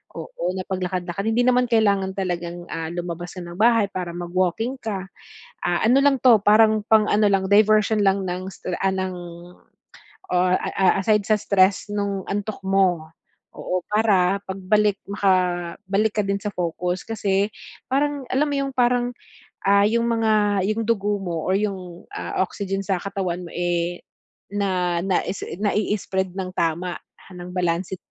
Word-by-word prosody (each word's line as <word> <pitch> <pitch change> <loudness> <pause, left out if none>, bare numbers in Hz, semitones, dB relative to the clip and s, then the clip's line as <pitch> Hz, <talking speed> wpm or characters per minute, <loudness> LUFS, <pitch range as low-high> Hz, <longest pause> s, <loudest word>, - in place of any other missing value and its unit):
oo, 165 +1 -8
na 185 - -3
pag-lakad-lakad, 185 -1 -3
hindi 225 +2 0
naman 250 0 +4
kailangan 200 -4 +2
talagang, 175 -2 -3
ah, 160 -1 -3
lumabas 175 0 -5
ka - - -6
ng 175 0 -9
bahay 225 -2 +4
para 180 -3 -4
mag-walking 185 +7 -1
ka. 195 -4 -4 0.6
Ah, 175 0 0
ano 250 +5 +5
lang 280 -1 +4
'to, 240 -4 +6
parang 215 0 +5
pang 220 -1 +5
ano 210 0 +3
lang, 195 -1 +2
diversion 215 +1 +4
lang 195 0 +2
ng, 180 +1 -4 0.3
ah, 190 0 +2
ng 185 -1 -2 1.2
ah 180 0 +3
ah, 190 -1 +2
aside 210 0 +2
sa 215 - +4
stress 195 +1 +2
nung 200 -1 -2
antok 205 +1 -2
mo, 190 -4 +2 0.5
oo, 180 0 -3
para 200 -3 +3
pag-balik, 200 +2 +1
makabalik 190 +1 0
ka 210 - +3
din 200 0 0
sa 210 - -2
focus. 180 +1 -2
Kasi 200 -2 0 0.4
parang, 285 0 0
alam 280 +4 +2
mo 290 - -2
'yung 275 0 -2
parang, 245 0 +2 0.5
ah, 200 +1 +5
'yung 230 +1 +1
mga, 215 -4 +2
'yung 215 +1 0
dugo 210 -2 +1
mo 170 -4 -3
or 185 - +2
'yung, 185 -4 -4
ah, - - -2
oxygen 195 0 -4
sa 195 -1 0
katawan 190 -3 -3
mo, - - -14
eh, 175 0 -1 0.5
na 185 -4 0
na 190 -2 +1 0.4
nai-spread 195 -2 -1
ng 185 -1 -3
tama, 170 +2 -1 0.3
ng 180 0 -8
balanse 180 +1 -1
195 Hz, 150 wpm, -23 LUFS, 180-215 Hz, 1.2 s, to